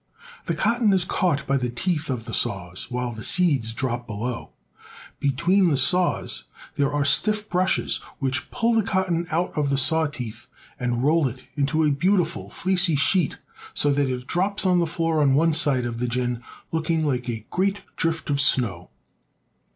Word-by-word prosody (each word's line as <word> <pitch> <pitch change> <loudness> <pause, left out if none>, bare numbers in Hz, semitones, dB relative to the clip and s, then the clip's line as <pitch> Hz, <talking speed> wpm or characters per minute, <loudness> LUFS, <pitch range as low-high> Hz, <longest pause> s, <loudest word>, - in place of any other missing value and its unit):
The - - -1
cotton 230 -3 +2
is 185 -2 +4
caught 165 -7 0
by 140 0 +1
the 125 -2 -2
teeth 150 +6 -2
of 120 -4 -3
the - - -7
saws, 95 -6 -2
while 125 -1 -3
the 110 -2 -8
seeds 140 -8 +2
drop 120 0 -3
below. 115 +3 -4 0.7
Between 170 +8 +2
the 145 - +1
saws 180 +7 +2 0.3
there 140 0 0
are 145 0 0
stifT 210 +8 +2
brushes 185 +1 +1 0.2
which 135 +2 -2
pull 235 -1 0
the 225 - +3
cotton 185 -4 -1
out 170 +2 -1
of 145 -2 0
the 140 - +1
saw 160 +3 +3
teeth 120 -5 -8 0.3
and 120 0 -1
roll 155 0 +3
it 130 +1 -9
out 145 -1 0
in 160 -1 +3
a - - +2
beautiful, 170 +3 0
fleecy 185 -3 +1
sheet, 145 +3 +1 0.4
so 145 - +2
that 140 -1 +1
it 125 -1 -4
drops 195 +7 0
on 180 -1 +3
the 170 - +1
floor 165 -1 0
on 135 -2 +3
one 165 +2 +3
side 145 -5 +2
of 115 -1 -4
the 125 - -1
gin 120 0 -2 0.3
looking 160 0 0
like 125 -4 -1
a 115 -2 -5
great 195 +2 0
drift 165 -2 -1
of 140 0 +2
snow. 100 -10 +2
145 Hz, 180 wpm, -24 LUFS, 125-175 Hz, 0.7 s, is